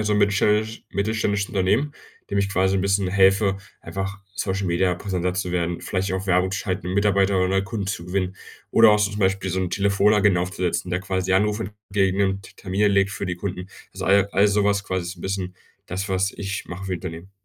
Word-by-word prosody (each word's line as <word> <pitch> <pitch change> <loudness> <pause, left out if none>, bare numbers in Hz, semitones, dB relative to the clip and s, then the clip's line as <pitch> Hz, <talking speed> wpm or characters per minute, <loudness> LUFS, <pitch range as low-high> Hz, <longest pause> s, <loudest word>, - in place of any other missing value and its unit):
ist - - -4
so - - +2
'n 105 - +2
mittelständisch 105 +2 +1
mittelständisches 105 -1 0
Unternehmen, 105 +10 +1 0.4
dem 100 - -2
ich 100 0 +1
quasi 95 -1 +2
'n 95 - 0
bisschen 100 -1 +1
helfe, 95 +1 +3 0.2
einfach 95 0 -5 0.2
Social-Media-präsenter 95 -1 -1
zu 90 -1 -3
werden, 85 -1 -1
vielleicht 95 0 -2
auch 95 +1 -3
Werbung 90 0 +2
zu 95 - -2
schalten, 90 -1 -3
Mitarbeiter 100 -1 +2
oder 90 0 +2
neue 95 +1 +1
Kunden 100 -1 -4
zu 95 -3 -3
gewinnen 95 +1 -2 0.3
oder 115 -1 +7
auch 105 - +4
so 105 0 +1
zum 105 +1 -5
Beispiel 95 0 +1
so 95 - -1
'n 90 -2 -1
Telefonagenten 100 0 +3
aufzusetzen, 90 -1 -2
der 90 +1 0
quasi 95 0 -1
Anrufe 105 +1 +1 0.2
entgegennimmt, 95 -1 0
Termine 100 +2 +1
legt 100 -1 +3
für 100 - -4
die 90 -2 -3
Kunden. 90 0 -5 0.3
Also - - -5
all 100 +1 +4
all 100 +2 +4
so 100 0 +2
was 100 0 +1
quasi 95 -1 -2
ist 90 - -4
so - - -20
'n - - -10
bisschen 95 -1 -3 0.3
das, 95 +2 -4
was 95 +1 +1
ich 100 -1 -5
mache 90 +2 -7
für 95 - -3
Unternehmen. 90 0 -6
95 Hz, 210 wpm, -23 LUFS, 95-100 Hz, 0.4 s, oder